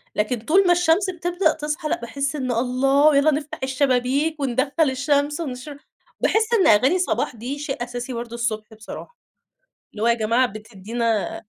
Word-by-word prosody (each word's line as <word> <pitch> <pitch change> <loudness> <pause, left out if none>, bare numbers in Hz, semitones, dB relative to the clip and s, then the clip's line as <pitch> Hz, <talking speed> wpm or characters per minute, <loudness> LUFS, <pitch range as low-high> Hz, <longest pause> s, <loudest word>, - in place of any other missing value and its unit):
لكن 220 +3 0
طول 355 - +3
ما - - +5
الشمس 355 +2 +3
بتبدأ 350 -1 0
تصحى 305 +1 -4
لأ، - - -1
باحس 275 +5 -3
إن 260 -3 -2
الله! 270 +5 +3
يلّا 305 +2 +4
نفتَح 295 0 -4
الشبابيك 265 +3 0
وندخّل 275 +3 +1
الشمس 285 +3 0
ونشر 280 -1 -6 0.4
باحس 440 +2 +1
إن 405 -5 +4
أغاني 260 - +4
صباح 355 - -1
دي 255 +6 -5
شيء 270 -4 -4
أساسي 245 +1 -6
ود - - -4
برضه 235 -1 -7
الصبح 220 -1 -3
بصراحة. 220 - -10 0.7
اللي 215 +1 -5
هو - - +3
يا 235 - +5
جماعة 230 +3 +2
بتدينا 215 +1 -3
265 Hz, 165 wpm, -22 LUFS, 235-305 Hz, 0.7 s, ما